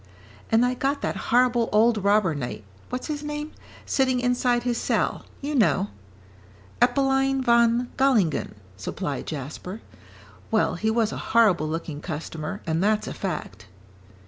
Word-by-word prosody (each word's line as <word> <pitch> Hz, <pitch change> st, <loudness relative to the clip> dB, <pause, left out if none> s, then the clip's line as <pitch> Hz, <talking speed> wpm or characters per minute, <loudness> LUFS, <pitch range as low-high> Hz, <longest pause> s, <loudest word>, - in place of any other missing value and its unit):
"And 225 Hz, +2 st, +5 dB
I 250 Hz, -, +1 dB
got 275 Hz, +3 st, -1 dB
that -, -, -1 dB
horrible 240 Hz, -1 st, +3 dB
old 220 Hz, -1 st, +3 dB
robber 200 Hz, -4 st, +3 dB
knight, 120 Hz, -7 st, -5 dB, 0.3 s
what's 250 Hz, -, -4 dB
his 300 Hz, -2 st, -3 dB
name? 295 Hz, +1 st, -5 dB, 0.3 s
sitting 260 Hz, -2 st, +1 dB
inside 245 Hz, -1 st, +1 dB
his 240 Hz, -1 st, 0 dB
cell, -, -, -1 dB
you 290 Hz, +2 st, -3 dB
know." 205 Hz, -6 st, +2 dB, 0.9 s
"Eppelein 270 Hz, +1 st, +2 dB
von 235 Hz, 0 st, +3 dB
Gallingen," 235 Hz, -, +2 dB, 0.2 s
supplied 140 Hz, -, -4 dB
Jasper. 155 Hz, -, -6 dB, 0.7 s
"Well, 220 Hz, -2 st, +2 dB
he 215 Hz, +5 st, -1 dB
was 225 Hz, -1 st, +1 dB
a -, -, -5 dB, 0.2 s
horrible 195 Hz, -9 st, +5 dB
looking 155 Hz, -2 st, -4 dB
customer, 155 Hz, -1 st, -5 dB
and 165 Hz, +2 st, 0 dB
that's 215 Hz, +1 st, +2 dB
a -, -, -5 dB
fact." 175 Hz, -, -5 dB
230 Hz, 140 wpm, -25 LUFS, 180-250 Hz, 0.9 s, And